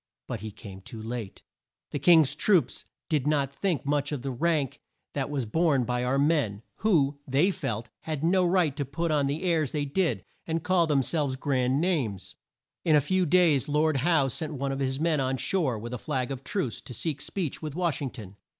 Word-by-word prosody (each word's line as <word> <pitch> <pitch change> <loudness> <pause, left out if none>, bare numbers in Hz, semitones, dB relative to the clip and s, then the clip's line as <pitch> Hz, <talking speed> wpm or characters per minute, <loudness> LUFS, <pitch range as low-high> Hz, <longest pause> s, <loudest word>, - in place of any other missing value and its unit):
But 120 - -4
he 110 +2 -6
came 100 -2 -11
too 110 +4 -9
late. 110 -2 -6 0.5
The 145 - -2
Kings 160 -2 +6
troops 180 +2 +2 0.2
did 150 -3 0
not 140 -2 +1
think 175 -2 -1
much 145 +1 0
of 140 -4 -3
the 135 - -2
rank 150 0 0 0.3
that - - -2
was 140 -4 -2
borne 145 +2 +2
by 125 +1 -1
our 125 +2 +1
men, 140 -8 +1
who, 150 -9 +2
they 145 +9 +3
felt, 115 - -4
had 155 -2 -4
no 185 +3 +3
right 175 -5 +2
to 145 - 0
put 160 +5 -2
on 145 -2 +2
the 145 +5 -2
airs 165 -6 +1
they 145 -2 0
did, 145 - 0 0.2
and 165 -1 -1
call 180 -3 +3
them 140 -3 +2
selves 145 -1 0
grand 130 -1 +1
names. 135 - -1 0.5
In 160 -3 +4
a - - +7
few 185 +5 +1
days 155 -5 +4
Lord 150 0 +2
Howe 150 0 +3
sent 155 +4 -3
one 140 0 -2
of 135 - -3
his 135 0 -1
men 160 -1 +2
on 130 0 0
shore 150 -7 0
with 120 +3 -6
a 125 - -4
flag 130 +2 -2
of 135 -1 -5
truce, 140 - -2
to 125 - -9
seek 150 0 -3
speech 175 -8 -3
with 155 -2 -5
Wash 170 -5 0
ing 135 - -2
ton. 105 -6 -11
145 Hz, 210 wpm, -27 LUFS, 130-165 Hz, 0.5 s, a